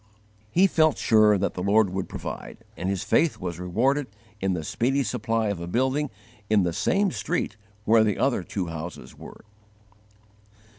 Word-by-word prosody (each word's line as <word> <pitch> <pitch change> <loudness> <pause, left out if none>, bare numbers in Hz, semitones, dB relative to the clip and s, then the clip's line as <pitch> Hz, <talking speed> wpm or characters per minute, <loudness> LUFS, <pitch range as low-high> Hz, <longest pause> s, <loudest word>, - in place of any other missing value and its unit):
He 180 - +4
felt 155 -5 +3
sure 110 -2 +4
that 100 +1 -1
the 90 - -5
Lord 100 +1 +3
would 95 0 -3
provide, - - -7
and 90 - -3
his 95 -2 -1
faith 165 -2 +2
was 90 -2 -5
rewarded 125 +11 0 0.3
in 95 -1 0
the 80 -3 -3
speedy 135 - 0
supply 115 -1 -1
of 100 -4 -3
a 85 - -6
building 130 +8 0 0.4
in 105 -3 +4
the 85 -1 -1
same 195 - +1
street 170 -12 -2 0.3
where 110 0 +5
the 105 -2 0
other 130 -6 +1
two 90 +1 -4
houses 80 +1 -7
were. - - -13
110 Hz, 165 wpm, -25 LUFS, 90-130 Hz, 0.4 s, where